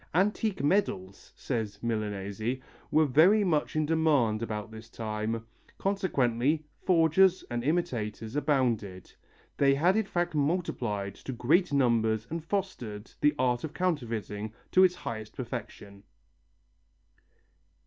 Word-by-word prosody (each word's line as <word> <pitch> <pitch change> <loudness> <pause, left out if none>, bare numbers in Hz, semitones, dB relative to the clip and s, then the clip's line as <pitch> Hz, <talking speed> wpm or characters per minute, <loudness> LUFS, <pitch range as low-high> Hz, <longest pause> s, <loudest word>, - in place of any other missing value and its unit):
"Antique 205 0 +1
medals," 140 - 0
says 110 -6 -3
Milanesi, 110 +1 -2 0.3
"were 155 +1 +4
very 170 - +5
much 155 -6 0
in 155 0 +2
demand 145 -9 +2
about 105 -2 -4
this 110 0 -11
time, 110 0 -3 0.3
consequently 150 - 0 0.2
forgers 180 +2 +4
and 120 0 -2
imitators 120 -8 -2
abounded; 120 - 0 0.4
they 140 -1 +4
had 175 +7 +3
in 220 -2 +1
fact 175 -2 -1
multiplied 135 - -1
to 135 - -8
great 155 +9 +2
numbers 115 -5 +2
and 165 -1 -3
fostered 140 - -4
the 150 0 +4
art 125 -2 +1
of 155 - -6
counterfeiting 115 - -2 0.2
to 185 - +6
its 180 -1 +4
highest 110 -9 -6
perfection." 110 -5 -7
130 Hz, 120 wpm, -29 LUFS, 110-165 Hz, 0.4 s, to